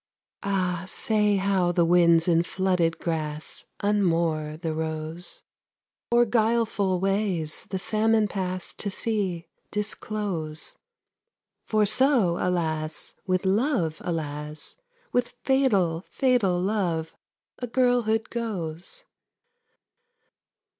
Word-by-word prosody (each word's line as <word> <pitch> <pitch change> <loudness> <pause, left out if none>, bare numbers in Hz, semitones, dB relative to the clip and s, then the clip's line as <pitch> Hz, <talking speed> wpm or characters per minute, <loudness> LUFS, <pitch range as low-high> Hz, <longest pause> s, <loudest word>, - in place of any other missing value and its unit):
Ah, 185 -3 -1
say 210 +1 +2
how 190 -2 +2
winds 170 -1 +4
in 165 -1 +4
flooded 180 -2 0
grass 155 -2 -4 0.2
Unmoor 165 -7 +1
the 165 -2 -2
rose; 160 +2 -4 0.7
Or 240 0 +5
guileful 220 -4 +1
ways 195 -5 0
the 190 - -2
salmon 215 +2 +3
pass 185 -3 -3
To 205 - -3
sea, 195 -5 -1 0.2
disclose; 205 -7 -3 0.9
For 215 -1 +2
so, 215 -5 +3
alas, 160 -3 0
With 185 +1 +1
Love, 195 - +1
alas, 150 -2 -4 0.4
With 245 0 0
fatal, 200 -12 +2
fatal 240 -9 +2
Love 180 -5 -1 0.5
a 245 - -3
girlhood 240 -3 +1
goes. 210 - -4
185 Hz, 90 wpm, -26 LUFS, 165-215 Hz, 0.9 s, Or